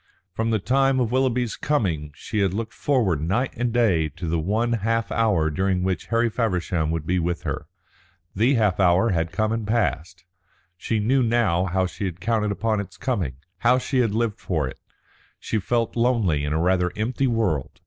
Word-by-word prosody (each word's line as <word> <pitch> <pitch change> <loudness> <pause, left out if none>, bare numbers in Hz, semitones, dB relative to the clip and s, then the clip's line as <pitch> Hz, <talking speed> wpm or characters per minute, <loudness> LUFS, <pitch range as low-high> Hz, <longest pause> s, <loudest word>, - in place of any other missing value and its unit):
From 115 +3 -1
the 110 - +2
time 135 +5 +2
of 120 -3 0
Willoughby's 125 -3 +1
coming 85 - -1
she 105 +7 -4
had 95 -2 +1
looked 110 +1 -4
forward 110 - +1
night 110 - 0
and 120 0 -1
day 100 -10 +2
to 85 +5 -7
the 80 +1 0
one 110 +8 0
half 115 +1 -1
hour 100 -9 +2
during 95 +2 0
which 95 -2 -2
Harry 115 +1 +2
Feversham 90 -8 -1
would 80 -1 -2
be 90 +2 +1
with 85 0 -2
her. - - -4 0.7
The 120 +8 +3
half 105 -5 +1
hour 95 +4 +4
had 80 -2 -1
come 110 +3 0
and 115 -2 -2
passed. 90 -6 -1 0.5
She 110 +5 -2
knew 125 +6 +2
now 110 -7 +2
how 95 0 0
she 100 +3 -5
had 90 -2 -4
counted 110 +1 0
upon 110 +1 0
its 100 - -7
coming, 100 - -2 0.2
how 120 +5 +4
she 130 +1 -1
had 115 -4 +1
lived 115 -1 -1
for 80 -7 -1
it. 65 - -9 0.6
She 110 - -2
felt 115 +3 -1
lonely 115 - +1
in 75 - -2
a 80 - +1
rather 90 +1 +2
empty 125 +5 0
world. 110 - -1
105 Hz, 190 wpm, -24 LUFS, 90-115 Hz, 0.7 s, hour